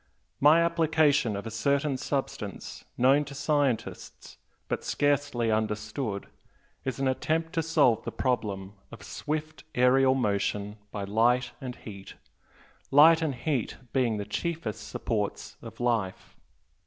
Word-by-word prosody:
My 155 +4 +6
application 155 -7 +2
of 100 - -5
a 115 - -5
certain 140 +5 +1
substance, 130 -7 -4
known 135 +4 +4
to 140 0 -9
scientists, 145 -4 -2 0.3
but - - -2
scarcely 145 -5 +1
understood, 110 0 -2 0.6
is 130 -2 -3
an 135 - +1
attempt 160 +5 -1
to 165 - +1
solve 150 -8 +3
the - - -4
problem 100 -6 -2 0.2
of - - -11
swift 155 +1 -4
aerial 130 +1 +4
motion 105 -3 -1
by 100 -1 -5
light 120 +5 +2
and 125 -2 -5
heat 100 -3 -10 0.7
light 160 +4 +7
and 150 -5 -1
heat 125 -2 -2 0.2
being 120 -5 +1
the 100 - -4
chiefest 140 - -4
supports - - -3
of - - -11
life. 115 -6 -1
130 Hz, 130 wpm, -28 LUFS, 110-145 Hz, 0.7 s, light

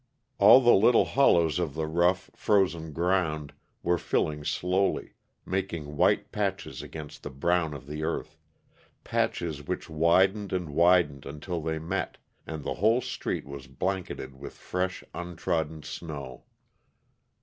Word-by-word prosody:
All 130 - +9
the 120 -1 +6
little 115 +5 +5
hollows 85 - +3
of 80 -6 -2
the 80 0 -1
rough, 85 +4 +1
frozen 90 -6 +1
ground 80 -3 0 0.3
were 85 0 +2
filling 75 -1 -1
slowly, 90 +5 0 0.3
making 85 -6 -3
white - - +2
patches - - -3
against 75 -2 -9
the - - -6
brown 80 +3 0
of 70 -1 -9
the 75 +2 -6
earth 80 - -3 0.7
patches 80 -4 -1
which - - -4
widened 95 +6 +3
and 90 -5 -2
widened 85 -4 +3
until 80 +4 -5
they 80 0 -2
met, 85 +5 -3 0.3
and 80 -2 -5
the - - -2
whole 115 +4 +4
street - - -3
was 70 -1 -9
blanketed 90 +1 -3
with - - -9
fresh, 90 0 -3
untrodden 80 -3 -3
snow. 70 -6 -7
85 Hz, 135 wpm, -28 LUFS, 75-90 Hz, 0.7 s, All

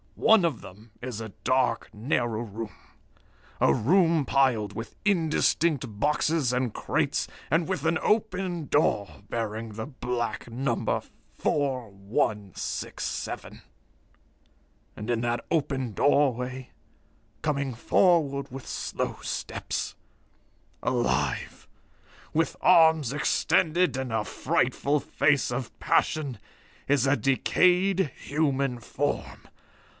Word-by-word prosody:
"One 220 -4 +5
of 150 -9 -1
them 105 +4 -13
is 125 -3 -5
a 110 - -6
dark, 130 -3 +1
narrow 115 0 -1
room 110 0 -6 0.9
a 70 - +4
room 165 - +3
piled 130 -7 +2
with 115 -1 -7
indistinct 160 - +1
boxes 150 -1 +1
and 125 -2 0
crates, - - 0 0.2
and 160 +1 +2
with 190 -3 -2
an 160 0 +3
open 185 -7 0
door 105 - +1
bearing 110 -1 -3
the 110 +1 -5
black 120 -5 -3
number 120 0 -1 0.4
4167. 105 - -2 1.3
And 105 +2 -7
in 120 -1 +1
that 120 0 -1
open 135 -6 0
doorway, 130 -1 +1 0.7
coming 140 -3 -1
forward 140 0 +2
with 135 0 -8
slow - - -3
steps - - -4 0.9
alive, 120 -2 -1 0.7
with 165 +1 +1
arms 160 -6 +5
extended 155 0 +2
and 130 -3 -3
a 110 -1 +1
frightful 145 +7 0
face 140 -4 +2
of 120 0 -4
passion 140 -8 +1 0.5
is 140 -2 +3
a 135 +1 +3
decayed 180 - +3
human 140 -4 0
form. 115 - -3
130 Hz, 100 wpm, -27 LUFS, 115-155 Hz, 1.3 s, One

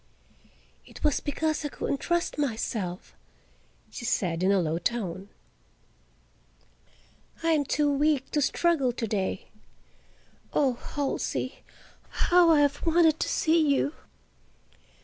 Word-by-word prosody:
"It - - -14
was 300 -2 +2
because 310 +1 -2
I - - -1
couldn't 280 - -3
trust 345 -2 -1
myself," 220 -8 -3 0.8
she - - -8
said 175 -7 -1
in 190 +2 +3
a 200 - +3
low 165 -1 -1
tone. 195 -2 -3 2.1
"I 330 - +2
am 300 -3 +2
too 290 +1 +1
weak 290 -1 +1
to 295 - +1
struggle 290 -4 +1
to 235 -1 -3
day; 195 -3 -3 1.0
oh, 270 -3 +2
Halsey, 280 +3 -3 0.5
how 350 -1 +4
I 310 -3 +5
have 285 0 +1
wanted 325 -1 +3
to - - -1
see 325 +1 +2
you!" 285 - 0
285 Hz, 120 wpm, -27 LUFS, 215-310 Hz, 2.1 s, I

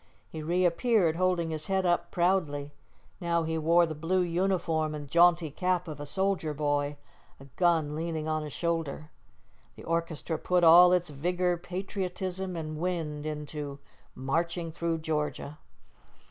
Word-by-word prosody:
He 160 - -6
reappeared, 175 +2 +2
holding 180 -2 +1
his 155 -1 -3
head 190 -1 +1
up 175 -1 +1
proudly. 160 -6 0 0.5
Now 170 -2 0
he 160 0 -2
wore 170 +2 +4
the 160 - -4
blue 165 +5 0
uniform 170 -3 0
and 145 -1 -7
jaunty 170 0 +4
cap 180 +2 -1
of 150 -2 -7
a 145 - -6
soldier 190 -4 0
boy; 145 0 -1 0.4
a 135 - -12
gun 165 -4 +2
leaned 160 -1 -3
on 155 0 0
his 150 -1 -6
shoulder. 160 -2 -3 0.6
The - - -12
orchestra 165 -1 -2
put 180 -1 +1
all 175 +2 +9
its 175 -3 +1
vigor, 180 +5 0
patriotism, 185 0 -4
and 155 -2 -5
wind 160 -4 -3
into 150 -2 -5 0.4
"Marching 165 +5 -2
through 165 0 -2
Georgia." 150 -1 -3
165 Hz, 145 wpm, -29 LUFS, 155-180 Hz, 0.6 s, all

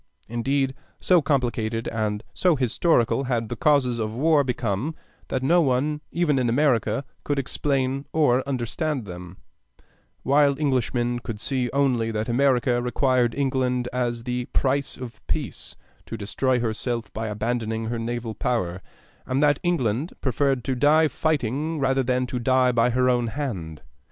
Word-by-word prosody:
Indeed, 135 +4 0 0.3
so 180 -3 +4
complicated 120 -5 -1
and 110 -1 -2
so 180 -3 +3
historical 130 0 +2
had 115 -3 -1
the 120 - -3
causes 130 -3 +2
of 110 0 -3
war 150 +2 +3
become 125 +3 -2 0.3
that 130 - -2
no 170 +6 +4
one 145 +2 0
even 160 -5 +1
in 125 -2 +1
America 120 -2 +1 0.2
could 145 - -1
explain 135 0 -1
or 140 -5 +3
understand 135 +1 -2
them, 90 0 -9 0.9
while 140 0 +3
Englishmen 125 -4 0
could 115 -3 -6
see 125 +1 -1
only 130 -5 +1
that 110 0 -2
America 125 -1 +2
required 125 -1 +1
England 130 -3 0
as 120 -2 -1
the 125 0 -2
price 140 +2 0
of 120 -4 -9
peace - - -4 0.3
to 115 - -5
destroy 125 +5 0
herself 115 -1 -3
by 110 +1 -3
abandoning 110 +1 -2
her 115 +1 -3
naval 115 0 -3
power, 95 -8 -2 0.5
and 130 +3 +1
that 145 -1 +3
England 145 -4 0
preferred 135 -1 0
to 130 - -1
die 150 +5 +4
fighting 155 +1 -1
rather 135 -1 +2
than 125 0 0
to 125 0 -4
die 130 +1 +3
by 120 0 +3
her 125 +1 +2
own 120 -2 +2
hand. 105 - -5
125 Hz, 150 wpm, -24 LUFS, 115-140 Hz, 0.9 s, so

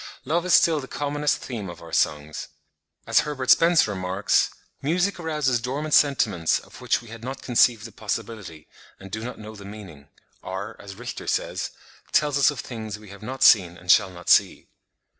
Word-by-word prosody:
Love 170 +6 0
is 185 - +6
still 160 -2 +4
the 135 - -8
commonest 145 +1 -1
theme 110 -7 -6
of 85 - -9
our 85 -1 -12
songs. 75 +1 -1 0.6
As - - +4
Herbert 135 -4 0
Spencer 165 -9 +5
remarks, 95 +1 +1 0.3
"music 180 +7 0
arouses 150 -7 0
dormant 145 +5 -3
sentiments 110 - +3
of - - -13
which - - 0
we 120 - -13
had 115 0 -10
not 130 +2 -6
conceived 120 -2 +3
the 115 - -9
possibility, 105 -6 -6 0.3
and 95 -1 -11
do 110 +2 -4
not 125 +1 -6
know 110 0 -10
the 100 - -11
meaning; 100 -9 -11 0.3
or, 95 +2 -6
as 100 -1 -10
Richter 120 +3 -7
says, - - -1 0.4
tells 145 -2 +2
us 140 - +6
of 145 - -4
things 110 -3 -6
we 105 -1 -14
have 100 +1 -12
not 130 +4 -3
seen 90 -4 +6
and 90 0 +1
shall 95 - +5
not 90 -1 -13
see." - - +3
115 Hz, 185 wpm, -24 LUFS, 95-140 Hz, 0.6 s, is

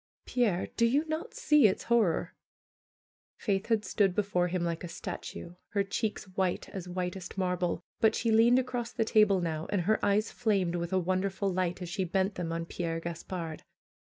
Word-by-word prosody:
Pierre, 215 -8 +1
do 235 - +5
you 285 +6 +2
net 315 +8 -4
see 300 -6 +5
its 190 - -1
horror?'' 225 -8 +2 1.0
Faith 195 -2 -1
had 220 -3 +1
stood 195 -1 +2
before 190 -4 +1
him 180 0 -1
like 170 0 -2
a - - -4
statue, 170 0 -7 0.2
her 200 -1 +2
cheeks 210 +2 -2
white 185 -1 -1
as 185 -2 -7
whitest 180 +1 -4
marble; 180 -2 0 0.2
but 220 0 +4
she 230 - +1
leaned 230 +3 +6
across 245 -2 -2
the 225 -3 0
table 210 -4 +4
now, 160 -2 -2
and 200 -3 +1
her 215 +5 +1
eyes 205 +2 +2
flamed 195 -7 +1
with 170 -1 -2
a 190 - +2
wonderful 190 +2 0
light 180 0 -1
as 175 - -6
she 190 +2 -1
bent 190 +3 0
them 175 -3 -4
on 165 0 -2
Pierre 165 -1 -3
Gaspard. 165 -1 -5
190 Hz, 180 wpm, -30 LUFS, 175-215 Hz, 1.0 s, leaned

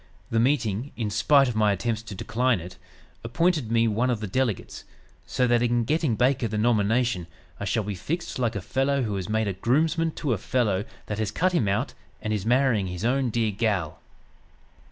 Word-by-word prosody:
The 115 - +2
meeting, 120 -1 0
in 110 -4 -2
spite 135 +6 +4
of 120 - -3
my 105 -1 +3
attempts 110 +3 -1
to 110 -3 -9
decline 115 +3 0
it, 90 +2 -10 0.4
appointed 150 0 0
me 115 0 +3
one 115 +4 +1
of 120 -3 0
the 110 - -4
delegates, 115 +1 -2 0.4
so 125 - +1
that 120 -1 +3
in 120 0 +2
getting 150 -1 +1
Baker 125 +1 +2
the 110 0 -3
nomination 110 -3 +1 0.3
I - - -3
shall 110 +2 0
be 105 0 -3
fixed 165 - -4
like 120 -4 0
a 100 - -2
fellow 135 +6 0
who 105 -3 -2
is 95 0 -5
made 110 0 +1
a 100 - -1
groomsman 155 - +1
to 140 -5 -1
a 105 - -2
fellow 105 -5 0 0.2
that 105 0 -4
has 110 -2 0
cut 185 - +1
him 150 - +1
out, 100 +2 0 0.3
and 110 - -2
is 105 0 -2
marrying 120 -5 +3
his 90 +4 -4
own 130 +1 +1
dear 115 -1 0
'gal.'" 100 -6 -1
115 Hz, 200 wpm, -25 LUFS, 105-130 Hz, 0.4 s, spite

